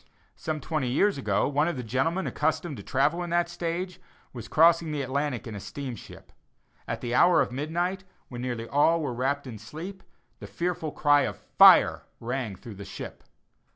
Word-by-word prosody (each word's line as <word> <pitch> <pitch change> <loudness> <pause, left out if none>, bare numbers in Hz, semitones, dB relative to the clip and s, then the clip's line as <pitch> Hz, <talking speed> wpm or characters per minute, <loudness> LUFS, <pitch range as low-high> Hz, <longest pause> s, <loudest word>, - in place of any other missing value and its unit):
Some 155 -1 -4
twenty 155 -5 -2
years 195 +6 +2
ago, - - +1
one 145 +2 +1
of 175 - -2
the 125 - -4
gentlemen 135 - 0
accustomed 160 0 -1
to - - -7
travel 150 +6 +1
in 175 - -4
that 175 0 +2
stage, 175 +1 -4 0.3
was 120 -3 -8
crossing 165 0 +4
the 145 -2 -2
Atlantic 135 -1 -2
in 115 - -7
a 100 - -6
steamship. 130 +1 -8 0.6
At - - -4
the 120 0 -3
hour 175 +7 +5
of - - +1
midnight, 175 +8 -2 0.2
when 120 -1 -7
nearly 120 -2 -4
all 155 +5 +3
were 145 -6 -2
wrapt 140 +4 -1
in 115 -5 -8
sleep, 170 - -8 0.4
the - - -8
fearful 170 -3 -3
cry 145 -1 +4
of - - -2
"fire" - - +6 0.2
rang 120 -3 -3
through 110 +4 -10
the 100 - -7
ship. - - -9
145 Hz, 185 wpm, -27 LUFS, 125-170 Hz, 0.6 s, fire